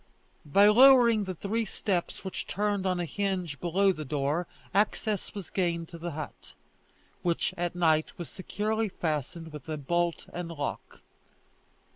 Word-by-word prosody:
By 200 +8 +6
lowering 235 -2 +7
the 185 -1 -4
three 215 +7 -1
steps 195 -3 -2
which 190 - -4
turned 205 -1 0
on 185 -1 0
a 175 - -1
hinge 185 -5 -2
below 190 +3 +3
the 155 -4 -5
door, 150 +4 -1 0.3
access 210 0 0
was 200 -4 -7
gained 170 -3 -1
to 170 - -9
the 170 -1 -4
hut, 155 0 -8 0.7
which 170 -1 0
at 175 0 -2
night 160 -3 +2
was 175 - -6
securely 215 +3 -2
fastened 160 -1 -3
with 150 -2 -9 0.2
bolt 175 +2 0
and 175 -1 -4
lock. 145 -4 -5
175 Hz, 145 wpm, -29 LUFS, 165-200 Hz, 0.7 s, lowering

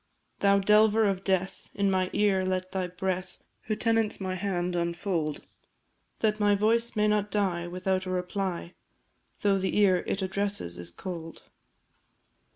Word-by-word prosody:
Thou 200 0 +4
delver 210 +2 +4
of 195 -1 -1
death, 190 -1 -1
in 200 -1 +2
my 185 -1 +1
ear 200 -2 +2
let 185 0 -2
thy 185 -1 -1
breath 185 +1 -3 0.3
Who 215 - -1
tenants 225 -1 +1
my 190 -1 -3
hand, 180 -2 -2
unfold; 170 -2 -2 0.8
That 215 -1 +1
my 205 -1 +4
voice 230 +3 +1
may 210 0 +3
not 210 -1 +1
die 185 -5 0
without 185 +1 -1
a - - -3
reply, 180 -1 -3 0.7
Though 200 -1 +3
the 190 +2 -1
ear 195 -3 +5
it 195 - -1
addresses 195 - -1
is 85 0 -3
cold. 165 - -8
190 Hz, 150 wpm, -28 LUFS, 180-205 Hz, 0.8 s, ear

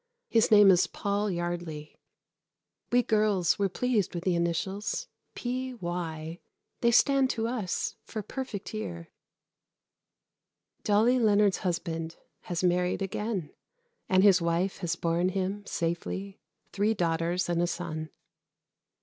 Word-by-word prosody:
His 225 -1 +3
name 205 -2 +8
is 180 -1 +4
Paul 205 +1 -1
Yardley. 175 -4 -4 1.0
We 245 0 +4
girls 210 -7 +2
were 200 -1 +2
pleased 220 -2 0
with 170 - -3
the 185 - +1
initials 180 - -1 0.3
P.Y. 175 -10 -4 0.4
They 235 - +3
stand 265 +3 +4
to 225 -2 -1
us 230 -7 -2
for 215 - -6
"Perfect 220 -3 -6
Year." 85 - -5 1.7
Dolly 225 +5 +3
Leonard's 210 -3 +4
husband 165 -2 -3 0.3
has 175 0 -3
married 180 +2 +1
again, 195 -3 -3 0.6
and 185 0 +4
his 195 -3 +6
wife 170 +3 0
has 175 -2 -1
borne 170 +1 +1
him 195 +2 -2
safely 190 +4 -3 0.3
three 210 +3 +1
daughters 170 0 0
and 170 -1 +1
a 175 - +2
son. 160 -3 -4
185 Hz, 120 wpm, -28 LUFS, 170-210 Hz, 1.7 s, name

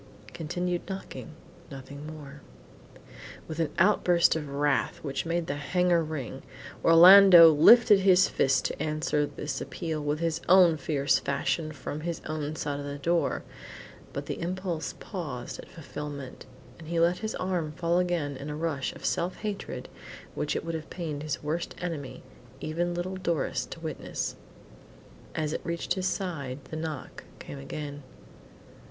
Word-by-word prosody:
Continued 175 +2 -2
knocking 190 -4 -7 0.3
nothing 140 +2 -9
more. 150 -2 -10 1.1
With 160 0 -6
an 165 - +1
outburst 180 -3 +4
of 150 -3 -4
wrath, 145 0 0
which 140 +1 -3
made 170 0 0
the 140 -1 -3
hangar 175 +3 +2
ring, 155 -5 -5 0.4
Orlando 175 0 +10
lifted 205 +7 +7
his 185 -1 +5
fist 135 -1 +1
to - - -3
answer 155 -1 0
this 150 - -5
appeal 155 -4 -3
in 150 - -1
his 165 0 -1
own 180 -3 +7
fierce 140 -1 +1
fashion 155 +3 -1
from 150 +1 -6
his 170 0 -3
own 155 -1 -3
side 145 -2 -3
of 145 - -6
the 140 0 -5
door, 170 +4 0 0.7
but - - -5
the - - -5
impulse 175 -2 -3
paused 145 - -6
at - - -10
fulfilment, 145 -4 -8 0.3
and 160 - -11
he 170 0 -1
let 170 +2 +3
his 220 0 -3
arm 180 -5 -2
fall 170 +2 +1
again 170 -6 -1
in 140 +3 -7
a 150 - -4
rush 150 -4 -2
of - - -10
self 175 +2 0
hatred 210 -2 -5 0.5
which - - -2
it - - -3
would 165 - -3
have 160 -1 -5
pained 160 -5 -5
his 150 -1 -4
worst 160 +3 -3
enemy, 160 -7 -5 0.4
even 175 +3 -2
little 185 +2 -3
Doris, 170 - -1
to - - -9
witness. - - -4 1.0
As 155 -1 -1
it - - -3
reached 170 +1 -2
his 185 0 -1
side, 160 -9 -3
the - - -4
knock 155 -3 -6
came 70 -2 -9
again. 145 - -6
160 Hz, 155 wpm, -28 LUFS, 145-175 Hz, 1.1 s, Orlando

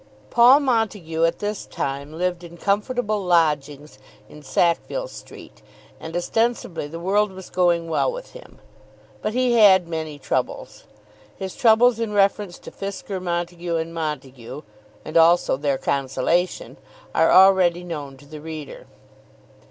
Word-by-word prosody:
Paul 250 +5 +6
Montague 210 - 0
at 165 0 0
this 210 0 -4
time 140 +2 -4
lived 175 +2 -2
in 170 0 -11
comfortable 210 +3 -1
lodgings 150 - 0 0.3
in 150 - -14
Sackville 175 - 0
Street, - - -13 0.4
and 160 +1 -8
ostensibly 225 -4 -1
the 165 +3 -8
world 200 +3 +1
was 190 -1 -11
going 175 -2 +1
well 165 - 0
with - - -9
him. - - -14 0.6
But 215 +2 -3
he 250 -2 +2
had 190 -4 +6
many 160 -3 -5
troubles. - - -4 0.5
His 190 -1 -6
troubles 230 0 +4
in 225 -2 -2
reference 200 -2 +1
to - - -8
Fisker, 195 -1 -6
Montague, 175 -1 -3
and 165 0 -3
Montague, 135 -4 -6 0.4
and 155 - -1
also 165 -1 +4
their 140 0 -1
consolation, 140 +8 -1 0.4
are - - +3
already 185 -2 +5
known 145 -6 -7
to 145 - -17
the 150 +1 -10
reader. 155 -2 -9
175 Hz, 135 wpm, -22 LUFS, 155-205 Hz, 0.6 s, Paul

